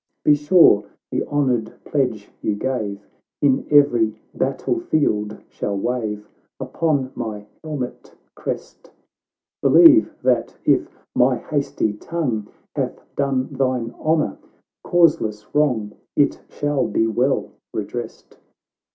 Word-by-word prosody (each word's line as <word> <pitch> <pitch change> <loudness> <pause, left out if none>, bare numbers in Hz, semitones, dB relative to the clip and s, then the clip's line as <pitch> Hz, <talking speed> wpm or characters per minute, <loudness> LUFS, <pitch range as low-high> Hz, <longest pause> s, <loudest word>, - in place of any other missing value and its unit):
Be 150 - +7
sure 150 - +5 0.3
the - - 0
honoured 125 -6 0
pledge 125 -8 -1
you 105 - 0
gave 105 -4 -3 0.3
Iu 140 -2 +2
every 120 -7 +4
battle 135 - -1
field 110 - 0
shall 100 -1 -3
wave 105 -2 -2 0.3
Upon 145 -6 -1
my 105 -2 -5 0.2
helmet 145 -6 -6 0.2
crest; - - -6 0.7
Believe, 330 -2 +7
that - - +1
if - - 0
my - - +4
hasty 140 -7 -1
tongue 115 -4 -3 0.3
Hath - - -3
done 135 -2 0
thine 130 -3 -1
honour 155 -10 0 0.4
causeless 130 -12 +2
wrong, 125 -9 +1 0.2
It 145 -1 +2
shall 145 -2 -1
be 115 - +1
well 125 +5 0 0.2
redressed. - - -6
130 Hz, 110 wpm, -21 LUFS, 110-145 Hz, 0.7 s, Be